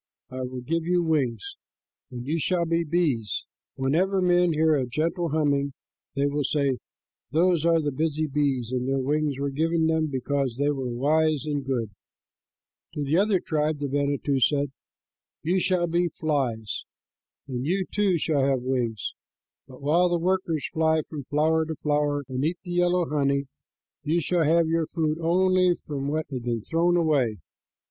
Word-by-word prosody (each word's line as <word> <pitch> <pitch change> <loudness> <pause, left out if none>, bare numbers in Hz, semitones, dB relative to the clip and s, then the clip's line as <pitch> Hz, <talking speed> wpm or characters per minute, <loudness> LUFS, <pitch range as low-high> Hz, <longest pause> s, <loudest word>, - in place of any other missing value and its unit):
I 130 0 -5
will 125 0 -5
give 165 +6 -1
you 175 +1 +1
wings, 160 - -1 0.5
and 125 -2 -7
you 160 +4 -1
shall 175 +2 +1
be 165 +1 +1
bees. 150 -10 0 0.3
Whenever 170 +9 +1
men 180 -1 +3
hear 160 0 +3
a 130 -3 0
gentle 165 +6 -1
humming, 140 -2 +1 0.4
they 140 0 +1
will 145 +1 0
say, 140 -2 0 0.5
'Those 170 +1 +2
are 165 -1 +4
the 150 -2 -1
busy 155 +2 -1
bees, 135 -5 -1
and 125 0 -1
their 135 - +1
wings 145 +1 0
were 140 0 -2
given 160 +3 +1
them 160 0 +2
because 135 -2 -1
they 145 +1 +2
were 135 -3 -3
wise 150 +4 +1
and 145 -2 -2
good.'" 120 -5 -2 1.0
To 150 - -2
the 145 +4 +1
other 200 -2 +3
tribe 155 -1 -1
the 145 0 -3
manito 140 0 0
said, 140 +1 +2 0.7
"You 180 +4 +2
shall 185 -1 +1
be 175 +1 +1
flies, 135 - -2 0.6
and 125 -2 -3
you, 185 +6 0
too, 200 -3 +1
shall 150 -3 +1
have 135 -2 +1
wings; 120 -4 -2 0.5
but 130 +1 -14
while 170 +5 +3
the 175 - +1
workers 175 -3 0
fly 160 -1 +2
from 145 -3 -8
flower 155 +3 +2
to 160 - -3
flower 145 -1 0
and 130 +1 -3
eat 165 +4 0
the 175 - -7
yellow 175 -1 +2
honey, 140 -1 +1 0.6
you 165 +3 +1
shall 170 +1 +1
have 165 +2 +4
for 160 - -2
your 165 -1 +1
food 155 -1 -1
only 185 +1 +3
what 145 +1 -2
has 130 -2 -3
been 120 -1 -2
thrown 175 +4 +2
away. 140 -10 +2
150 Hz, 170 wpm, -26 LUFS, 135-165 Hz, 1.0 s, are